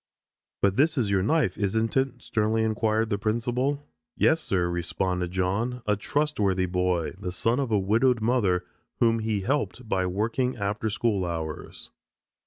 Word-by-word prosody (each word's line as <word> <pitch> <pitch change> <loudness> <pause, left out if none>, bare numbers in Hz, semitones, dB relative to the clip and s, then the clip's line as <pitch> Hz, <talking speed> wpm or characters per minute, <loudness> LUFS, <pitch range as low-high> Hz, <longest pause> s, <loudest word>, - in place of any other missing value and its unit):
"But 100 -1 +3
this 155 +2 +3
is 110 -6 +1
your 95 -1 +3
knife, 130 - +1
isn't 110 +3 0
it?" 130 -2 0
sternly 110 +1 +1
inquired 110 0 +1
the 100 - -1
principal. 120 +6 -1 0.3
"Yes, 160 0 +3
sir," 90 - 0
responded 90 +1 -2
John, 100 +7 -1
a 105 - +2
trustworthy 105 -7 0
boy, 90 -2 0
the 90 -3 -4
son 115 +8 +1
of 135 -3 -1
a 105 - +4
widowed 115 +6 +2
mother 105 -6 +1 0.3
whom 115 -1 +3
he 110 -2 -1
helped 130 +1 -2
by 95 -3 0
working 115 +7 -1
after 105 +2 -1
school 105 -3 0
hours. 80 -3 -5
110 Hz, 155 wpm, -26 LUFS, 95-120 Hz, 0.3 s, a